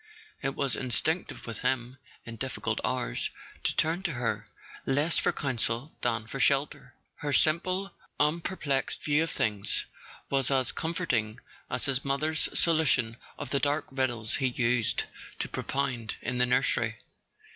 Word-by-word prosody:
It 135 0 -1
was 140 -4 0
in¬ 130 - -1
stinctive 160 +8 0
with 115 -3 -4
him, 130 0 -1 0.3
in 115 -1 -7
difficult 130 +3 -2
hours, - - -1 0.3
to - - 0
turn 165 +3 +2
to 175 -5 -1
her, 120 -2 -1 0.4
less 145 +5 +2
for - - +2
counsel 125 0 -1
than 115 -2 0
for 125 +5 -6
shelter; 135 -2 +1 0.2
her 150 -2 -2
simple 185 +6 +2 0.3
unper¬ 165 +5 +1
plexed 135 -3 -1
view 150 +1 +3
of 165 - 0
things 105 -7 0 0.4
was 135 -2 +2
as 130 -2 +2
comforting 125 -10 -1 0.3
as 125 - 0
his 135 -1 0
mother's 155 +3 +1
solution 150 -9 +3 0.2
of 140 -3 -5
the 140 - +3
dark 145 +2 +1
riddles 120 -5 0
he 130 - +2
used 120 -2 +2 0.3
to - - -1
propound 130 -5 -2
in 125 +1 -1
the 125 - +4
nursery. 120 -2 +2
135 Hz, 150 wpm, -29 LUFS, 120-150 Hz, 0.4 s, the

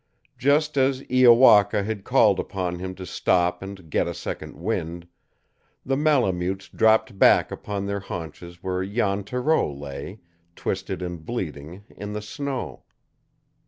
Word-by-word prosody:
Just 145 +3 +2
as 135 0 +1
Iowaka 120 -5 +6
had 105 -1 -4
called - - +4
upon 90 -2 -3
him 95 0 -5
to 95 - -8
stop 90 0 +1
and 95 -3 -9
get - - +1
a - - -4
second - - -6
wind, 85 -3 -4 0.8
the 135 - 0
Malemutes 100 - +1
dropped 110 -2 +2
back - - +5
upon 100 -1 -4
their 100 0 -2
haunches 85 -1 -8
where 95 0 -1
Jan 100 0 -1
Thoreau 125 - 0
lay, 70 +7 -8 0.4
twisted 95 -1 -3
and 85 -3 -6
bleeding, 85 - -6
in 105 0 -6
the 105 - -4
snow. 135 +4 -5
100 Hz, 135 wpm, -24 LUFS, 90-115 Hz, 0.8 s, Iowaka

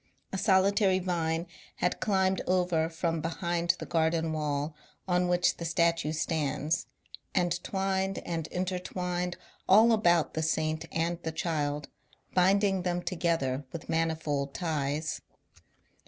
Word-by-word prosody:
A - - 0
solitary 195 -1 +4
vine 170 -2 -1 0.3
had 180 - 0
climbed 190 -2 +2
over 180 -3 +2
from 165 -1 -1
behind 170 +1 0
the - - -6
garden 160 0 +1
wall 150 0 -1 0.3
on 180 0 +2
which 175 0 +2
the - - -6
statue 165 -1 +1
stands, 155 -1 -1 0.5
and 175 -1 +1
twined 195 0 -1
and 165 -2 -3
in 180 +1 -2
tertwined 180 -1 -3 0.3
all 220 +5 +7
about 175 -7 +3
the 160 - -1
Saint 155 0 0
and 170 +1 -1
the 160 - -3
Child, 150 -3 -2 0.5
binding 195 +1 +3
them 175 0 -1
together 165 -7 0
with 165 - -8
manifold 160 -4 -1
ties. 155 -2 -2
170 Hz, 125 wpm, -29 LUFS, 160-180 Hz, 0.5 s, all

